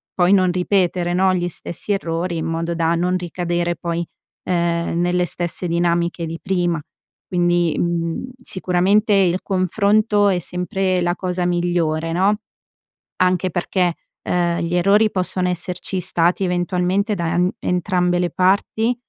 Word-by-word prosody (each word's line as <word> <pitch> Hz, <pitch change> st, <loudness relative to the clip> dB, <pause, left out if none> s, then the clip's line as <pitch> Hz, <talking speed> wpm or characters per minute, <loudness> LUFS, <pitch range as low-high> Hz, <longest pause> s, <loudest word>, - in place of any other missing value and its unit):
poi 180 Hz, 0 st, +3 dB
non 185 Hz, -2 st, +4 dB
ripetere 180 Hz, -1 st, +1 dB
no, 185 Hz, +1 st, +3 dB
gli 175 Hz, -1 st, -1 dB
stessi 175 Hz, +4 st, -6 dB
errori, 170 Hz, -2 st, -2 dB
in 160 Hz, -, -3 dB
modo 165 Hz, +1 st, -2 dB
da 165 Hz, 0 st, +1 dB
non 180 Hz, +2 st, +1 dB
ricadere 175 Hz, -1 st, -2 dB
poi, 170 Hz, 0 st, -3 dB, 0.4 s
ehm, 170 Hz, -1 st, 0 dB
nelle 180 Hz, 0 st, +1 dB
stesse 175 Hz, +1 st, -4 dB
dinamiche 170 Hz, 0 st, 0 dB
di 165 Hz, +1 st, -6 dB
prima. 175 Hz, -4 st, 0 dB, 0.5 s
Quindi, 175 Hz, -2 st, +1 dB
mhmm, 170 Hz, +7 st, -2 dB
sicuramente 190 Hz, +1 st, +1 dB
il 185 Hz, -2 st, +3 dB
confronto 205 Hz, +2 st, +2 dB
è 185 Hz, -2 st, +1 dB
sempre 180 Hz, +1 st, -1 dB
la 175 Hz, 0 st, 0 dB
cosa 180 Hz, -1 st, -2 dB
migliore 170 Hz, -2 st, 0 dB
no? 195 Hz, +4 st, +2 dB, 0.9 s
Anche 185 Hz, 0 st, +2 dB
perché, 175 Hz, 0 st, 0 dB, 0.3 s
ehm, 175 Hz, -1 st, 0 dB
gli 170 Hz, +1 st, -2 dB
errori 200 Hz, +5 st, +4 dB
possono 185 Hz, -1 st, -1 dB
esserci 180 Hz, +1 st, -3 dB
stati 175 Hz, +1 st, +1 dB
eventualmente 180 Hz, +3 st, 0 dB
da 170 Hz, -3 st, -2 dB
n 180 Hz, +1 st, +2 dB
entrambe 180 Hz, 0 st, 0 dB
le 175 Hz, 0 st, +1 dB
parti, 200 Hz, +6 st, +1 dB
180 Hz, 140 wpm, -20 LUFS, 170-185 Hz, 0.9 s, non